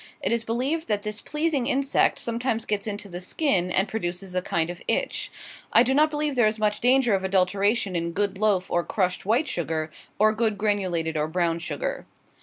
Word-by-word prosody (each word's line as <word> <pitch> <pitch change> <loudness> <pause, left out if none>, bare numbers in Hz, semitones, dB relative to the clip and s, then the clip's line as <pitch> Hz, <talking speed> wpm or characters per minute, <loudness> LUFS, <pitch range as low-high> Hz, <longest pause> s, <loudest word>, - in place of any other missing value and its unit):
It - - -1
is 235 -1 +1
believed 260 +9 -1
that 205 -2 -1
this 210 0 -4
pleasing 300 -4 -1
insect 275 +1 +2
sometimes 230 -1 -2
gets 210 0 -2
into 205 0 -4
the 175 -1 -7
skin, 185 - 0
and 190 +2 +2
produces 180 -3 -4
a 185 - 0
kind 170 -1 -1
of 175 - -10
itch. - - -1 0.4
I 235 - +6
do 255 +2 +1
not 305 +3 +4
believe 300 -1 -1
there 240 -3 +4
is 215 +1 0
much 210 -1 0
danger 250 -2 +4
of 190 -1 +1
adulteration 195 +2 +1
in 170 0 -1
good 200 0 -1
loaf 205 -4 +1
or 175 - +2
crushed 185 -1 -1
white 245 +8 +2
sugar, 160 - -2 0.3
or 215 +1 +4
good 220 -2 0
granulated 185 -6 0
or 150 0 0
brown 170 0 0
sugar. - - -4
210 Hz, 200 wpm, -25 LUFS, 180-240 Hz, 0.4 s, I